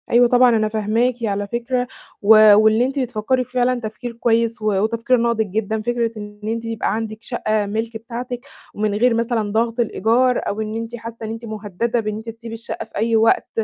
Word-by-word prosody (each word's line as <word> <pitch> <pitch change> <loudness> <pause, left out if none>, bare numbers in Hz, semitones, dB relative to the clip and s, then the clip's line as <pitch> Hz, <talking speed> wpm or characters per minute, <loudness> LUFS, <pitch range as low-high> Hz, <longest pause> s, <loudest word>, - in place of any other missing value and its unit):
أيوه، 240 +1 +5
طبعًا 250 +1 +5
أنا 215 -2 +2
فاهماكِ 220 +3 +1
على 205 -2 -1
فكرة، 245 +3 -2 0.3
و 215 0 +8
واللي 220 +3 +4
أنتِ 270 +2 -2
بتفكّري 250 0 0
في 250 - -20
فعلًا 250 0 +1
تفكير 220 +2 -6
كويس 230 0 0
و - - -5 0.2
وتفكير 230 +3 +1
ناضِج 230 -2 +1
جدًا. 220 +1 -1
فكرة 235 0 -1
إن 210 0 -9
أنتِ 230 +2 -3
يبقى 225 -2 -1
عندِك 220 -1 -4
شقّة 215 -3 -1
مِلك 220 +2 -3
بتاعتِك 240 +2 -6 0.3
ومن 210 0 -1
غير 240 +3 +3
مثلًا 230 -2 0
ضغط 230 +2 0
الإيجار 235 +3 +2
أو 210 +2 -2
إن 215 0 -4
أنتِ 230 +1 -5
حاسّة 230 0 -8
إن 220 - -4
أنتِ 225 +1 -7
مهدّدة 215 +2 -2
بإن 215 -1 -3
أنتِ 220 +1 -7
تسيبي 230 0 -9
الشقّة 230 +1 -6
في - - -30
أي 225 +2 +1
وقت 225 0 +3
225 Hz, 200 wpm, -20 LUFS, 215-240 Hz, 0.3 s, و